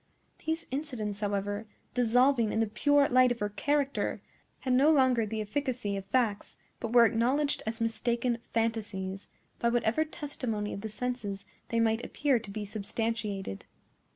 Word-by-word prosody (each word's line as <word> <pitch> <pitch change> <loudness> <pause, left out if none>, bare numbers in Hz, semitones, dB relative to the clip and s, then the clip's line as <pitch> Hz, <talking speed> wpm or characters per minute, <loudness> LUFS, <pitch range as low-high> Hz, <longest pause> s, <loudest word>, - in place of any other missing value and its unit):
These 320 +1 -1
incidents, 245 -8 -3
however, 205 +1 -2 0.3
dissolving 245 -1 +3
in - - 0
the 225 - +3
pure 285 +6 +3
light 255 0 +5
of 245 - -1
her 210 -2 -1
character, 285 +5 0 0.4
had 255 - 0
no 270 +4 +5
longer 260 -7 +4
the 220 +1 -3
efficacy 245 -2 -2
of 195 -1 -5
facts, 230 -6 0 0.2
but 230 - -4
were 240 -1 +7
acknowledged 255 +7 +2
as 225 +1 -3
mistaken 235 +1 0
fantasies, 205 -4 -2 0.3
by 235 - +2
whatever 235 +4 +2
testimony 255 -9 -3
of 200 - -5
the 220 - -4
senses 215 -3 -4 0.2
they 230 - +1
might 225 +1 +2
appear 280 -4 +1
to 215 - -11
be 210 +1 -4
substantiated. 205 - -3
230 Hz, 155 wpm, -30 LUFS, 210-255 Hz, 0.4 s, were